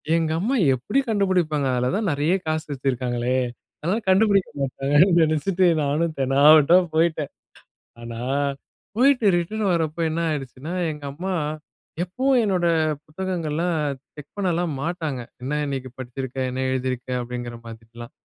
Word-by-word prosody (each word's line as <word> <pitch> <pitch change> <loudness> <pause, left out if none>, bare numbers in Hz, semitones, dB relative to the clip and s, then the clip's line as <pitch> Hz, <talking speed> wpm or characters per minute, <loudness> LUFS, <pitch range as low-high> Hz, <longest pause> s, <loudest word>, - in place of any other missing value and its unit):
எங்கம்மா 165 +10 0 0.2
எப்படி 130 - -1
கண்டுபிடிப்பாங்க? 185 -9 +1
அதில 125 0 +1
தான் 215 -1 -1
நெறைய 145 +4 +1
காசு 155 0 -1
வச்சிருக்காங்களே! 125 -2 -1 0.5
அதா 180 +6 +1
கண்டுபிடிக்க 195 0 +4
மாட்டாங்கன்னு 140 +6 +3
நினச்சிட்டு 170 +4 +1 0.2
நானும் 155 +3 0
தெனாவெட்டா 145 +5 +6 0.2
போய்ட்டேன். 160 -2 +1 0.7
ஆனா, 115 -1 -7 0.8
போய்ட்டு 250 -1 +4
ரிட்டர்ன் 210 +5 -2
வரப்ப 160 -2 -1
என்ன 160 +2 -2
ஆயிடுச்சுன்னா, 140 +1 -5 0.2
எங்கம்மா, 150 +5 -5 0.7
எப்பவும் 255 +8 +1
என்னோட 185 -4 +1 0.4
புத்தகங்கள்லாம் 170 0 -2 0.4
செக் 150 -1 -12
பண்ணலாம் 175 -4 0
மாட்டாங்க. 160 -5 -3 0.2
''என்ன 140 +4 -2
இன்னைக்கு 135 -2 -4
படிச்சிருக்க? 130 +1 -6
என்ன 130 +1 -3
எழுதியிருக்க?'' 130 -1 -2
அப்டிங்கிற 120 0 -6
மாதிரிலாம். 115 +1 -11
155 Hz, 115 wpm, -23 LUFS, 130-180 Hz, 0.8 s, தெனாவெட்டா